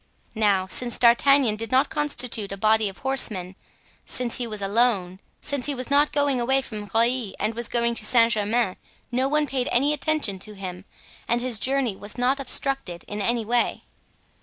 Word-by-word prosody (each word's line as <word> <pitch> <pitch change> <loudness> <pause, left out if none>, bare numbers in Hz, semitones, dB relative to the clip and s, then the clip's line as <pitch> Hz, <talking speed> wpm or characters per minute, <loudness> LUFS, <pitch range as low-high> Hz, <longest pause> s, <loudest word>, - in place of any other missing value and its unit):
Now, 205 -4 +2
since 240 +5 -2
D'Artagnan 245 -1 +4
did 225 0 -5
not 260 +3 +2
constitute 250 -8 -1
a 195 - -5
body 215 +1 +2
of 195 - -12
horsemen, 210 -9 0 0.5
since 245 -2 -2
he 245 - -3
was 215 -2 -5
alone, 200 -3 +1 0.2
since 285 -3 -2
he 290 - -2
was 255 +2 -6
not 290 +1 +4
going 285 -4 +1
away 265 +3 +2
from 210 -5 -7
Rueil 230 -1 +1
and 220 - -1
was 235 +1 -3
going 235 0 +1
to 230 - -4
Saint 230 +1 +5
Germain, 215 -1 0 0.3
no 255 +2 +1
one 300 +1 +1
paid 260 -3 -2
any 280 +5 +2
attention 300 -10 0
to 210 +3 -11
him 185 -2 -8 0.4
and 235 - +1
his 240 -3 -3
journey 260 -3 +1
was 205 +4 -9
not 255 +3 +1
obstructed 270 -9 -1
in 205 0 -4
any 230 +2 0
way. 240 +2 0
235 Hz, 185 wpm, -24 LUFS, 210-265 Hz, 0.5 s, Saint